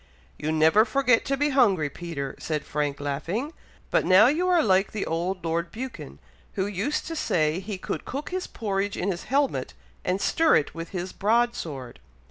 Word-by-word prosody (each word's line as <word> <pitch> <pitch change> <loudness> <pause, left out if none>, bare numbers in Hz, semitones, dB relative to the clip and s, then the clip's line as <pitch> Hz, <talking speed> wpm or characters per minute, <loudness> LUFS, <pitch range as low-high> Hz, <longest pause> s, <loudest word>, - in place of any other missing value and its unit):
"You 155 +1 -1
never 160 +7 +5
forget 250 0 +2
to 275 0 0
be 290 +2 +2
hungry, 200 - +3
Peter," 145 -2 -5
said 150 -3 -3
Frank, 145 -2 -2
laughing. 165 - -3 0.4
"But - - +3
now 190 +4 +7
you 315 +8 +2
are 350 -3 +4
like 190 -2 +2
the 210 - -2
old 175 +2 -2
Lord 170 +1 -1
Buchan, 225 - -7 0.4
who 190 - -1
used 205 +9 -2
to 330 - -5
say 155 - +1
he 195 +1 -5
could - - -4
cook 280 +3 -5
his 370 0 -3
porridge 200 -2 -2
in 195 +2 0
his 175 - -6
helmet, 260 - 0 0.3
and 185 +2 0
stir 325 +9 +3
it 145 - +1
with 165 0 -6
his 185 -1 -5
broad 235 +4 +2
sword." 135 - -7
190 Hz, 185 wpm, -26 LUFS, 160-245 Hz, 0.4 s, now